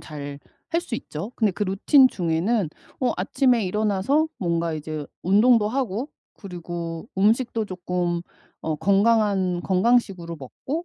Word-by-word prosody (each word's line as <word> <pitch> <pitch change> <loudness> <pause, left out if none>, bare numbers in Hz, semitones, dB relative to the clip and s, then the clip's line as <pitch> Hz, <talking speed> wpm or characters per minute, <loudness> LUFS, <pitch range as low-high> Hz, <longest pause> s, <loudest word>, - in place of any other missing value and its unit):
잘할 145 -2 -8 0.4
수 300 -9 -4
있죠. 160 +4 -6
근데 215 -4 +2
그 210 - -4
루틴 230 +8 +5
중에는 180 +2 0 0.3
어 255 - +2
아침에 240 +3 +2
일어나서 210 +9 +1
뭔가 170 -4 0
이제 155 -1 -5 0.2
운동도 210 +4 +4
하고 245 0 -2 0.2
그리고 170 -1 -6
음식도 225 +2 +2
쪼끔 180 -2 -2 0.4
어 160 - -1
건강한 200 -2 +2
건강식으로 190 -4 +1
먹고 275 - -5
195 Hz, 270 characters per minute, -24 LUFS, 170-230 Hz, 0.4 s, 루틴